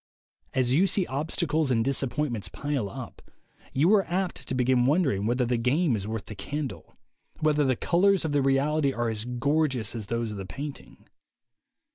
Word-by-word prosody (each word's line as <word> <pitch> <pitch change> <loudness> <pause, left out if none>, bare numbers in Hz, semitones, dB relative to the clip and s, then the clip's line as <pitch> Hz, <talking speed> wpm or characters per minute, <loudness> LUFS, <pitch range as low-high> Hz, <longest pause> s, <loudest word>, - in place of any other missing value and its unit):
As 130 -1 +2
you 180 +8 +4
see 185 0 +1
obstacles 155 +1 -1
and 115 -3 +2
disappointments 135 -6 -1
pile 140 -3 -2
up, - - -9 0.5
you 160 +9 +3
are 200 -2 +5
apt 180 +1 -2
to 130 - -2
begin 125 0 +3
wondering 135 - +2
whether 125 +2 +1
the 120 0 +1
game 130 +4 +2
is 100 -1 -4
worth 110 -1 -4
the - - -8
candle, 135 - -5 0.4
whether 150 -1 +2
the 130 -2 +2
colors 190 - +2
of 155 - -1
the 145 -1 +2
reality 140 +1 +2
are 120 -1 -1
as 110 0 -3
gorgeous 125 -1 0
as 110 -4 -6
those 115 0 -2
of 105 - -6
the 95 - -5
painting. 145 +6 -8
135 Hz, 175 wpm, -27 LUFS, 115-150 Hz, 0.5 s, are